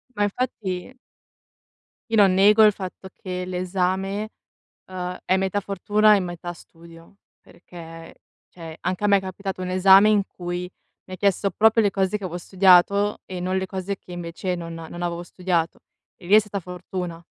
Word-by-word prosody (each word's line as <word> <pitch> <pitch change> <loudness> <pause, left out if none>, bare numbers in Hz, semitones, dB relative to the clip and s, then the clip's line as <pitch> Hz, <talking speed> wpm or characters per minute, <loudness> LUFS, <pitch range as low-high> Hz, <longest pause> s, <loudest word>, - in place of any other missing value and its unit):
Ma 205 - +1
infatti 205 -2 -4 1.2
io 225 - +1
non 195 -3 +5
nego 210 +3 +6
il 210 - +6
fatto 190 -1 -8
che 180 -1 -5
l'esame, 185 +3 -2 0.6
uhm, 180 -1 -5
è 185 - +2
metà 190 +1 -1
fortuna 205 +2 +3
e - - 0
metà 175 -1 -6
studio, 165 +2 -17 0.2
perché, 165 -2 -13 0.3
cioè 165 -2 -10
anche 185 +3 -3
a - - +5
me 200 - +5
è - - -4
capitato 190 0 -6
un 180 - -4
esame 190 +2 +6
in 210 -2 +3
cui 175 0 -6 0.3
mi 185 - -9
ha - - -7
chiesto 200 +1 +1
proprio 220 +4 +4
le 205 - +2
cose 195 +1 0
che 200 - -9
avo 175 -1 -4
studiato 190 +3 +3
e 185 -1 -6
non 185 +1 -1
le 190 - -1
cose 190 +1 -4
che 180 - -14
invece 175 +1 -4
non 165 -1 -7
non 165 +1 -8
avevo 170 0 -3
studiato. 175 -2 -2 0.4
E 175 - -15
lì 195 - +4
è - - +10
stata 205 -1 -5
fortuna. 180 -1 -7
185 Hz, 175 wpm, -23 LUFS, 175-200 Hz, 1.2 s, è